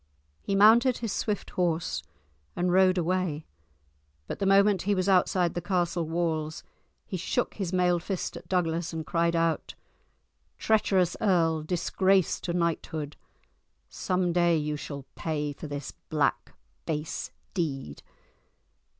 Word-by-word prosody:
He 200 - -1
mounted 230 +5 +6
his 230 -3 -3
swift 210 -3 -2
horse 170 -2 -1 0.5
and 180 0 +1
rode 185 0 +4
away, 175 -3 -1 0.8
but - - -6
the 195 - 0
moment 195 -1 +5
he 205 +1 +1
was 185 0 0
outside 180 -2 +3
the 175 - -3
castle 175 -2 0
walls 160 -2 -2 0.4
he 185 - -4
shook 245 +8 -1
his 190 -4 -3
mailed 180 -2 +2
fist 190 0 -3
at - - -10
Douglas 170 -2 0
and 160 -1 -4
cried 170 0 +1
out— 165 -1 0 0.8
"Treacherous 195 -5 +2
earl, 165 -6 +2
disgrace 185 +3 +1
to 175 - -3
knighthood, 165 -3 -2 0.7
some 180 -1 -1
day 175 -1 +3
you 150 0 -2
shall 140 -2 -7
pay 150 -2 -2
for 150 - -8
this 145 -1 -5 0.2
black, 150 -2 0 0.3
base 155 0 -3 0.2
deed!" 135 - -3
175 Hz, 135 wpm, -28 LUFS, 160-185 Hz, 0.8 s, mounted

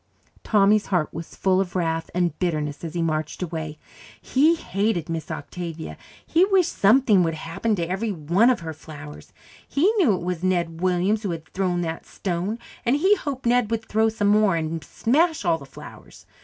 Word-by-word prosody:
Tommy's 210 0 +3
heart 180 -5 0
was 165 +1 -8
full 190 0 +2
of 185 -1 -5
wrath 165 -2 -1
and 175 -1 0
bitterness 155 -5 -2
as 165 0 -6
he 170 - 0
marched 155 +1 -2
away. 160 -3 -5 0.4
He 305 +6 +3
hated 195 - -1
Miss 165 -1 -4
Octavia; 165 +1 -6 0.3
he 335 +3 +3
wished 380 -3 +2
something 215 -1 +5
would 165 -2 0
happen 165 +8 -2
to 170 -3 -2
every 195 +5 -2
one 175 - +3
of 250 -8 +1
her 160 -1 -5
flowers; 150 -1 -11 0.4
he 355 +10 +2
knew 255 - +4
it 175 - -5
was 180 -1 -3
Ned 175 -3 -1
Williams 185 +4 +1
who 205 - -3
had 165 -2 -5
thrown 180 -2 -1
that 165 -1 -4
stone, 185 +4 -3 0.3
and 245 +2 +2
he 375 +8 +4
hoped 280 -8 -5
Ned 240 -2 +3
would 225 -1 -2
throw 220 +1 +2
some 210 -2 0
more 210 -3 +4
and 160 -1 -3
smash 310 - +1
all 165 -1 +2
the 140 - -11
flowers. 135 - -13
185 Hz, 185 wpm, -24 LUFS, 165-220 Hz, 0.4 s, something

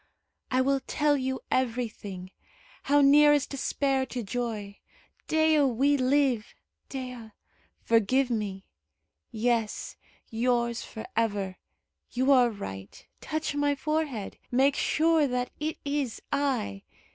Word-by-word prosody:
I 255 0 +2
will 275 +1 +2
tell 295 -1 +2
you 260 -1 -2
everything. 225 -7 -2 0.5
How 290 +1 +4
near 295 +1 +7
is 290 -3 +2
despair 275 -1 0
to 245 -2 -4
joy! 215 -3 -4 0.5
Dea, 315 -1 +3
we 275 +2 +3
live! 260 -3 +1 0.3
Dea, 250 -5 -7 0.5
forgive 240 +4 +2
me. 200 -4 -3 0.6
Yes 225 -1 -1 0.3
yours 235 0 0
for 220 - -8
ever. 205 -4 -1 0.5
You 260 +3 +1
are 250 -3 +6
right. 95 - -8
Touch 315 -1 -3
my 290 0 +1
forehead. 290 -7 -2
Make 270 +3 +3
sure 320 -1 +2
that 250 -1 -2
it 310 +1 -2
is 280 -5 -2
I. 270 - -1
255 Hz, 115 wpm, -28 LUFS, 225-285 Hz, 0.6 s, near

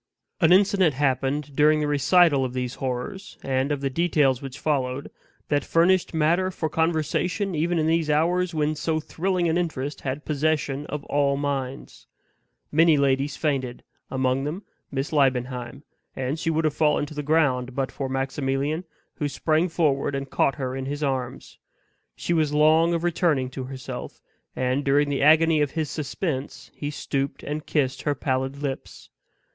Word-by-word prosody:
An 165 -3 +4
incident 190 - +4
happened 135 +1 0
during 150 +1 +4
the 150 - 0
recital 145 0 +4
of 125 -1 -3
these 125 -1 -3
horrors, 130 +9 -4
and 135 +1 0
of 145 -1 -1
the 135 - 0
details 145 -4 +2
which 135 -1 -7
followed, 135 -3 -1 0.4
that 145 -2 +1
furnished 175 +2 +3
matter 170 +4 +2
for 160 -4 -3
conversation 170 +5 0
even 170 +2 0
in 155 - +1
these 160 -1 +1
hours 175 +4 +2
when 155 -2 0
so 155 +1 -1
thrilling 180 +3 -1
an 165 +2 +1
interest 150 -4 -3
had 135 +2 -4
possession 150 -1 -1
of 150 -1 -5
all 140 -1 +1
minds. 140 -2 -4 0.6
Many 160 0 +5
ladies 140 +1 +1
fainted; 135 -5 -2 0.3
among 130 0 0
them 160 +8 -4 0.3
Miss 135 +2 -3
Liebenheim 130 -1 0 0.3
and 135 +4 -2
she 165 - -1
would 160 0 +1
have 155 - +1
fallen 150 -1 +2
to 150 - -10
the 150 - -3
ground 140 -5 +1
but 135 -1 -1
for 135 -2 -4
Maximilian, 135 +4 -1 0.3
who 150 - -1
sprang 160 +4 +1
forward 145 -4 +1
and 135 0 -5
caught 135 - +2
her 130 -3 -3
in 135 0 -4
his 145 +2 -3
arms. 130 -3 -3 0.6
She 175 - -2
was 155 -3 +2
long 160 +3 +4
of 170 - -2
returning 160 -7 +1
to 130 -1 -5
herself; 130 -1 -7 0.4
and, 130 +2 0
during 145 +1 +3
the 140 - -1
agony 155 +1 +5
of 145 - +2
his 155 0 -3
suspense, 150 -2 -4
he 145 - -5
stooped 140 -2 -3
and 150 +1 -5
kissed 135 -3 0
her 145 -1 0
pallid 130 0 -2
lips. 135 -2 -6
145 Hz, 165 wpm, -25 LUFS, 135-160 Hz, 0.6 s, Many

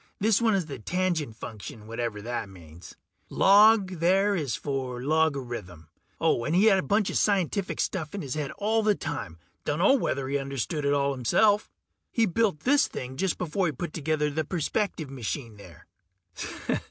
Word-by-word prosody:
This 215 +1 +3
one 225 -3 +3
is 185 -4 0
the 140 -5 -7
Tangent 170 - -1
Function, 110 -1 -9
whatever 115 -2 -4
that 120 -3 -4
means. 85 -3 -13 0.3
Log, 200 -2 +5
there, 195 +4 +3
is 140 - -1
short - - -10
for 130 -3 -3
logarithm. 130 - -1 0.3
Oh, 120 - +2
he 180 +7 +3
had 195 -3 +5
a - - +1
bunch 205 +8 +1
of - - 0
that - - +3
scientific 195 -1 0
stuff 160 -2 -2
in 200 - -4
his 135 -3 -4
head 150 -2 -3
all 220 +2 +1
the 210 -1 +3
time; 100 - -5 0.3
dunno 170 - +3
whether 140 - 0
he 140 +1 0
understood 140 +2 -3
it 140 - +3
all 140 0 +1
himself. 205 - +2 0.4
He 230 -3 +2
built 200 -5 0
this 285 +3 +3
thing 130 +1 -6
just 185 +5 -1
before 180 +2 -1
he 155 - -2
put 155 +5 -5
together 155 -1 0
the 160 +2 -1
perspective 165 -1 -2
machine 120 -2 -5
there. 90 -4 -14
150 Hz, 175 wpm, -27 LUFS, 125-195 Hz, 0.4 s, Log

